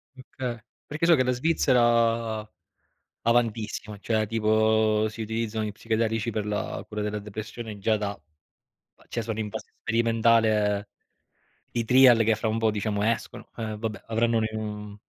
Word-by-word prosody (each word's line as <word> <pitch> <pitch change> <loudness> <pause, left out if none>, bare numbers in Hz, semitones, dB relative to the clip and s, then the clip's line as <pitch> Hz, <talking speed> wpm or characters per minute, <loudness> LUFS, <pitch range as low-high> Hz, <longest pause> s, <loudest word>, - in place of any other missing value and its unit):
Okay. 130 -2 -6 0.3
Perché 150 +3 -2
so 170 - +6
che 130 -4 +4
la 125 - +1
Svizzera, 120 -5 +2 0.8
avantissima, 110 -3 0
cioè 110 0 0
tipo 110 -1 +2
si 110 +1 -6
utilizzano 110 0 -2
gli 105 - -4
psichedelici 115 +1 -1
per 105 -1 -3
la 105 0 -3
cura 105 -1 -5
della 105 0 -2
depressione 105 +1 -7
già 110 +2 +2
da 100 -1 -3 0.9
cioè 115 - -3
sono 110 -1 -4
in 105 -2 -3
fase - - -7
sperimentale 110 -3 +2 0.8
i 120 - -1
trial 125 0 +6
che 110 0 +3
fra 110 +1 -2
un 110 +1 0
po', 110 -1 +2
diciamo, 105 0 -1
escono. 115 +1 -2
Eh, 110 -2 -3
vabbè, 110 -2 -5
avranno 115 +1 +1
un 110 - +1
e 110 - -5
mhmm, 105 -1 -6
110 Hz, 155 wpm, -26 LUFS, 105-115 Hz, 0.9 s, so